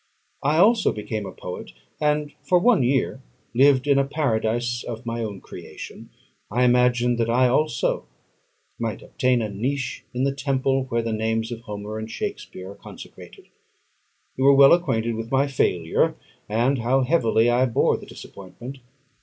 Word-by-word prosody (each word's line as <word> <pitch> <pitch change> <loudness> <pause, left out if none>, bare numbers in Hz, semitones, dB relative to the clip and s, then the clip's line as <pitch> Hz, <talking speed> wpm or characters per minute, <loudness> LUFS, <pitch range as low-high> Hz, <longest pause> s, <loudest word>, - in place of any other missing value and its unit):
I 150 +3 +1
also 210 +4 +4
became 105 -1 -4
a - - -7
poet, 90 - -8 0.3
and 150 -1 0
for 180 - +3
one 215 - +4
year 130 +1 0 0.3
lived 135 +1 +4
in 140 -1 +4
a - - +3
Paradise 120 -4 -1
of 115 +1 -7
my 115 0 -3
own 100 -3 -6
creation; - - -10 0.4
I 120 +5 +1
imagined 125 -1 +3
that 115 0 +1
I 125 +2 +4
also 140 +1 0 0.7
might - - -3
obtain 125 -2 +1
a 110 - -3
niche 125 +6 -3
in 125 +1 -2
the 135 0 +1
temple 135 -1 0
where 115 -2 -1
the 115 -1 -2
names 110 +1 -1
of 115 -1 -6
Homer 105 0 -6
and 110 0 -6
Shakspeare 95 -3 -6
are - - -12
consecrated. - - -13 0.9
You 135 +1 +3
are 140 - +7
well 135 +2 +8
acquainted 115 -10 +1
with 115 0 -5
my 135 +2 +2
failure, 90 - +1 0.3
and 120 +5 +1
how 125 +4 +2
heavily 120 -5 +2
I 125 +2 +3
bore 115 - +2
the - - -12
disappointment. 120 +8 -10
125 Hz, 160 wpm, -23 LUFS, 115-135 Hz, 0.9 s, well